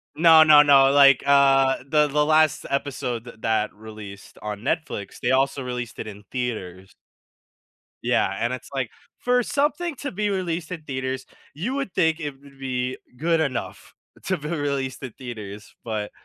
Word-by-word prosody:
No, 160 -1 +7
no, 150 -2 +8
no, 135 -2 +6
like, 140 -2 +6
uh, 135 -1 +4
the 150 +1 +3
the 150 +1 +1
last 155 0 +3
episode 130 -4 -2
th 120 - -11
that 110 -1 0
released 105 -2 -11
on 105 -1 -5
Netflix, 135 - -3
they 120 - +1
also 135 +1 +1
released 125 -2 -5
it - - -5
in 105 -1 -10
theaters. 95 -7 -5 1.1
Yeah, 95 - +1
and 120 - 0
it's 130 - -8
like 135 -4 -2 0.3
for 250 0 +2
something 295 +5 -1
to 285 - -5
be 210 +2 -1
released 175 -4 -3
in 175 -3 -5
theaters, 130 -2 -4 0.3
you 205 - -3
would 275 -9 -3
think 160 -1 +2
it 150 -3 -3
would 140 -1 -18
be 130 -1 -3 0.2
good 165 +3 +1
enough 140 -6 -4 0.3
to 185 - 0
be 150 -1 -7
released 140 -5 -2
in 130 - -5
theaters, 105 -5 -9
but 110 -2 -3
135 Hz, 165 wpm, -24 LUFS, 120-155 Hz, 1.1 s, no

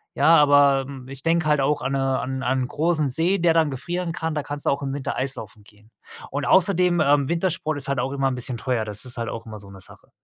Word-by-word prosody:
ja, 165 - +5
aber, 145 -2 +4
hm, 135 -2 -10
ich 135 0 -8
denke 165 +1 +1
halt 150 -2 +2
auch 145 +2 0
an 130 - -2
ne 135 -1 0
an 130 +1 -4
n' 130 - -5
an 130 +1 0
n' - - -3
großen 155 +1 0
See, 165 +9 +1
der 170 -2 +3
dann 160 -2 +2
gefrieren 170 +6 -4
kann, 160 -1 -3
da 150 - -2
kannst 145 0 -4
du - - +3
auch 140 - -2
im 135 -1 -3
Winter 140 -1 -4
Eislaufen 120 -5 -5
gehen. 105 +1 -23 0.4
Und 140 +1 -3
außerdem, 180 -1 +3
ähm, 140 -2 +2
Wintersport 170 -2 -1
ist 140 - -3
halt 140 -2 -1
auch 130 +2 -2
immer 135 -1 0
'n 130 - -1
bisschen 125 0 -2
teuer, 115 0 -1
das 105 +3 -3
ist 125 0 -3
halt 115 -1 -3
auch 115 - -7
immer 110 -2 -9
so 100 -1 -14
'ne 100 0 -12
Sache. - - -12
140 Hz, 270 wpm, -23 LUFS, 130-160 Hz, 0.4 s, ja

